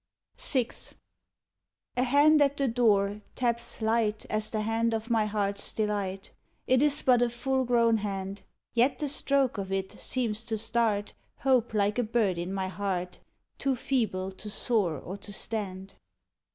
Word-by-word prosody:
VI 260 - +2 1.3
A 250 - +1
hand 290 +4 +5
at 285 0 +3
the 275 - +1
door 210 -4 +2
taps 235 -2 -1
light 220 -1 +1
As 215 0 +2
the 215 - -2
hand 225 +1 0
of 225 +2 -4
my 220 -2 +2
heart's 200 -1 -2
delight: 200 -3 -2 0.3
It 255 0 +3
is 295 0 +4
but 245 -2 +4
a 245 - +3
full 260 +2 -1
grown 235 -2 +3
hand, 195 -1 -4 0.3
Yet 245 +4 +3
the 295 - -2
stroke 275 -4 +1
of 195 -1 -5
it 190 0 -2
seems 225 -4 -2
to 225 -1 -1
start 220 -2 0 0.3
Hope 250 -4 +2
like 205 +2 +1
a - - +2
bird 215 -6 +1
in 175 +2 -3
my 190 -1 -2
heart, 185 -2 -3 0.4
Too 270 -1 +1
feeble 215 -8 -1
to 200 +3 -8
soar 205 -6 +1
or 180 +8 -7
to 205 - -6
stand. 195 -2 -4
220 Hz, 160 wpm, -28 LUFS, 200-245 Hz, 1.3 s, hand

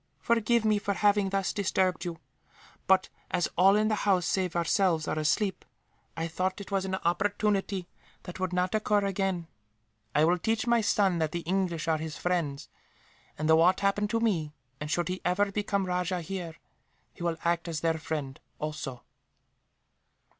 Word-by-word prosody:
Forgive 235 -1 +2
me 215 -1 +3
for 205 -1 -2
having 205 -1 +3
thus 195 0 0
disturbed 185 -4 0
you 170 -1 -4 0.7
but, 190 0 +4 0.2
as 175 - +1
all 190 +3 +6
in 215 +1 +3
the 215 - +1
house 185 -4 +2
save 185 -1 0
ourselves 170 -1 +2
are 155 - -1
asleep, 185 +6 0 0.5
I 165 0 -1
thought 185 +3 -2
that 200 - -7
it - - -15
was 195 -1 0
an 190 0 -1
opportunity 195 +1 0 0.4
that 180 - -8
would 185 -1 -1
not 180 +1 0
occur 210 -1 +2
again. 195 -3 -1 0.7
I 150 - +5
will 175 +2 +2
teach 220 +5 0
my 235 -1 +3
son 195 -4 +2
that 155 -1 -1
the 170 - -2
English 175 -2 -1
are 160 -1 +2
his 155 -1 -5
friends 165 -6 -1 0.7
and, 155 - -1
should 160 0 +6
aught 180 +3 +4
happen 200 +1 +1
to 230 +2 0
me, 165 -10 0 0.2
and 145 - -5
should 175 +3 0
he 185 0 -3
ever 200 +3 +1
become 200 -1 -1
rajah 180 0 -1
here, 175 -2 -5 0.6
he - - -15
will 170 -1 -1
act 170 0 +1
as 160 -3 -3
their 165 -1 +1
friend, 150 -4 -4 0.2
also." 150 -5 -5
185 Hz, 175 wpm, -29 LUFS, 165-200 Hz, 0.7 s, all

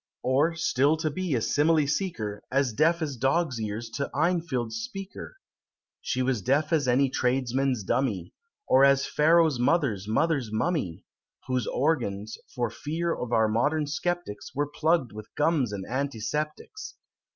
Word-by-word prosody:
Or, 145 +6 +2
still 150 -2 +2
to 155 -1 -1
be 180 -2 -2
a 115 - 0
simile 150 +5 +3
seeker, 125 - -2
As 135 -3 +1
deaf 165 +6 +2
as 145 -3 -3
dogs' 135 0 0
ears 110 +2 -4
to 140 +4 -3
Enfield's 160 -9 0
Speaker! 225 - -7 0.6
She 130 - -1
was 125 -4 0
deaf 145 - +1
as 145 -5 +2
any 130 +3 +4
tradesman's 130 -1 0
dummy, 105 -5 -1 0.3
Or 135 - +5
as 140 0 +5
Pharaoh's 160 -3 +3
mother's 120 - +1
mother's 135 0 0
mummy; 110 - -2 0.4
Whose 130 -1 -1
organs, 110 -8 -1 0.2
for 120 -3 -1
fear 160 +7 -2
of 125 -1 -5
our 110 -2 +3
modern 145 +8 +1
sceptics, 155 -7 -4
Were 145 +2 +1
plugg'd 160 -6 +1
with 105 0 -11
gums 150 -6 +1
and 100 -2 -5
antiseptics. 145 - -4
140 Hz, 145 wpm, -27 LUFS, 120-160 Hz, 0.6 s, Or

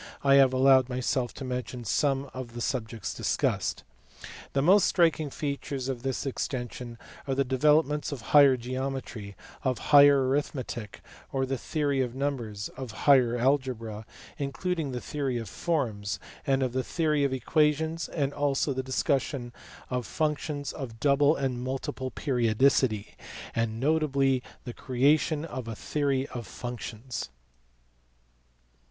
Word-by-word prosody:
I 140 -1 +5
have 135 -2 +6
allowed 130 0 +5
myself 125 0 -1
to 135 - -6
mention 125 -1 -4
some 135 +5 +1
of 125 -2 -7
the - - -5
subjects 115 -3 -3
discussed. - - -1 0.7
The 135 - +2
most 185 +4 +6
striking 165 -4 +2
features 140 -2 -4
of 125 -3 -3
this 135 +1 -2
extension 125 -2 -4 0.3
are 135 - 0
the 140 - +2
developments 150 +3 +2
of 140 -4 -5
higher 140 -3 +8
geometry, 125 -4 -5 0.3
of 130 -3 0 0.2
higher 140 -2 +8
arithmetic 130 -5 -3 0.3
or 135 -1 0
the 135 +1 -2
theory 145 -3 0
of 125 -1 -2
numbers, 120 -7 -3
of 130 -2 -8 0.2
higher 125 -4 +5
algebra 120 -4 -1 0.3
(including 150 +2 -2
the 125 -1 -4
theory 135 -4 -2
of 115 -2 -5
forms), 110 - -2 0.3
and 135 -1 +2
of 125 -2 -1
the 130 0 0
theory 150 0 +1
of 140 - +1
equations, 155 +5 +1
also 145 -1 0
the 130 - -2
discussion 130 -1 -1 0.4
of 125 -3 -2
functions 150 -2 -2
of 115 -5 -7
double 145 +3 +4
and 130 -3 -2
multiple 130 0 -3
periodicity, 120 -3 +1 0.4
and 115 -1 -1
notably 140 -2 +2 0.2
the 120 - -6
creation 145 +5 +1
of 130 -7 -6
a 115 - -4
theory 140 +1 -1
of 120 -5 -6
functions. 120 - -6
135 Hz, 135 wpm, -28 LUFS, 125-145 Hz, 0.7 s, higher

